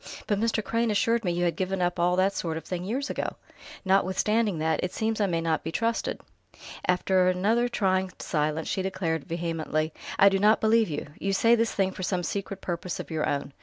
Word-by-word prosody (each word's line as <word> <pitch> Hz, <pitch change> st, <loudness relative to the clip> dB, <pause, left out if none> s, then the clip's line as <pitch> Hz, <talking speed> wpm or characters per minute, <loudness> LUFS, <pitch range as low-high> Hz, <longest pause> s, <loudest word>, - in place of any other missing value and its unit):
"But 205 Hz, -2 st, 0 dB
Mr. 225 Hz, -1 st, 0 dB
Crane 230 Hz, +2 st, 0 dB
assured 230 Hz, +2 st, +2 dB
me 180 Hz, -, 0 dB
you 175 Hz, +1 st, -1 dB
had 170 Hz, -, 0 dB
given 190 Hz, 0 st, -2 dB
up 175 Hz, 0 st, 0 dB
all 175 Hz, +1 st, +3 dB
that 190 Hz, +2 st, +2 dB
sort 165 Hz, -4 st, -3 dB
of 160 Hz, -, -6 dB
thing 180 Hz, +1 st, -4 dB
years 260 Hz, +8 st, -2 dB
ago!" -, -, -3 dB, 0.5 s
"Notwithstanding 195 Hz, +2 st, +2 dB
that, 160 Hz, 0 st, 0 dB
it 180 Hz, -, -1 dB
seems 220 Hz, 0 st, -1 dB
I 200 Hz, -, +3 dB
may 165 Hz, -2 st, 0 dB
not 160 Hz, -1 st, 0 dB
be 160 Hz, -, -4 dB
trusted...." 230 Hz, +5 st, -1 dB, 0.7 s
After 180 Hz, 0 st, +3 dB
another 215 Hz, +7 st, +2 dB
trying 190 Hz, -4 st, +1 dB
silence 155 Hz, +1 st, -1 dB
she 190 Hz, -, -1 dB
declared 170 Hz, -5 st, -2 dB
vehemently: 165 Hz, -2 st, -2 dB, 0.2 s
"I 200 Hz, -, +7 dB
do 195 Hz, 0 st, +1 dB
not 210 Hz, +2 st, +5 dB
believe 220 Hz, -1 st, +3 dB
you! 145 Hz, -, -3 dB
You 195 Hz, 0 st, -1 dB
say 230 Hz, +4 st, +4 dB
this 230 Hz, -1 st, +1 dB
thing 190 Hz, -1 st, +1 dB
for 190 Hz, -, -8 dB
some 180 Hz, -1 st, -1 dB
secret 195 Hz, +2 st, -4 dB
purpose 175 Hz, 0 st, -4 dB
of -, -, -7 dB
your 155 Hz, -1 st, 0 dB
own. 140 Hz, -1 st, -3 dB
185 Hz, 210 wpm, -27 LUFS, 170-210 Hz, 0.7 s, I